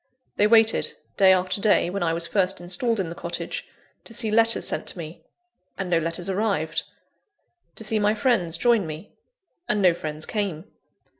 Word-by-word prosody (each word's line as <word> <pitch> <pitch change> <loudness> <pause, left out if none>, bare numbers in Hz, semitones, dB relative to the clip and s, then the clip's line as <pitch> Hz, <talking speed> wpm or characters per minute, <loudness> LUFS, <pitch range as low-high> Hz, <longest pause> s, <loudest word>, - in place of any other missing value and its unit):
They 210 - +3
waited, 225 0 +3 0.2
day 190 -1 +6
after 185 +1 +1
day, 205 -4 +3
when 200 - -3
I 170 -1 +1
was 165 +1 0
first 185 +1 +1
installed 200 +6 +1
in 180 -4 -2
the - - -6
cottage, 170 0 -5 0.4
to 230 - -11
see 225 -3 0
letters 225 +1 +3
sent - - -2
to - - -2
me 165 -1 -8 0.6
and 190 -2 -4
no 170 - +4
letters 165 +2 -3
arrived: 195 -5 -1 0.9
to - - -7
see 215 0 +1
my 210 +1 +2
friends 205 -8 +1
join 225 -2 +2
me 155 +6 -8 0.6
and 210 - +1
no 185 -3 +5
friends 155 -2 -5
came. 195 -6 -3
190 Hz, 175 wpm, -24 LUFS, 170-215 Hz, 0.9 s, day